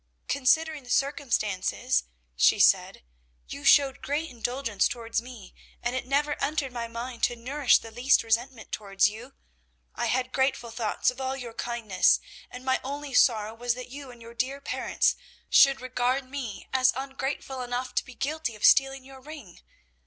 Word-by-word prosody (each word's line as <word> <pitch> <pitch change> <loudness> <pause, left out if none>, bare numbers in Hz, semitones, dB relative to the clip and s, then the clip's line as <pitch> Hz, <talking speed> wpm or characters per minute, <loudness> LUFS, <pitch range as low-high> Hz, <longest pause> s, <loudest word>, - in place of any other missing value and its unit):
"Considering 290 +3 +2
the 245 - -14
circumstances," 215 - 0 0.3
she - - +4
said, - - +3 0.4
"you 140 - -8
showed 280 -1 +5
great 295 +3 -2
indulgence 240 -3 -1
towards 230 -1 -3
me, 235 -6 -12 0.3
and 240 +1 -1
it 255 - -3
never 290 +2 0
entered 285 -2 -1
my 235 -1 -4
mind 235 +1 -7
to 240 - +2
nourish 260 +3 +3
the 225 - -10
least 245 +4 +3
resentment 230 +1 -2
towards 200 -1 +1
you. 240 +5 -11 0.6
I 240 - -2
had 255 +2 -1
grateful 265 -3 0
thoughts 225 +1 0
of 250 +1 -10
all 265 +1 -2
your 240 -3 -7
kindness, 230 -6 +1 0.3
and 250 +1 -10
my 260 0 +1
only 285 +1 -6
sorrow 220 -4 +3
was 240 +1 -1
that 250 0 -8
you 280 0 -9
and 240 -2 -13
your 230 0 -11
dear 260 +3 -2
parents 280 - 0 0.4
should 275 -1 +6
regard 255 +1 -1
me 260 -6 -6
as 260 0 +4
ungrateful 270 0 -4
enough 245 +1 -4
to - - +1
be 255 - -13
guilty 280 -3 -3
of 210 - -1
stealing 270 -1 +4
your 265 0 -13
ring. 280 - -11
255 Hz, 165 wpm, -27 LUFS, 230-270 Hz, 0.6 s, should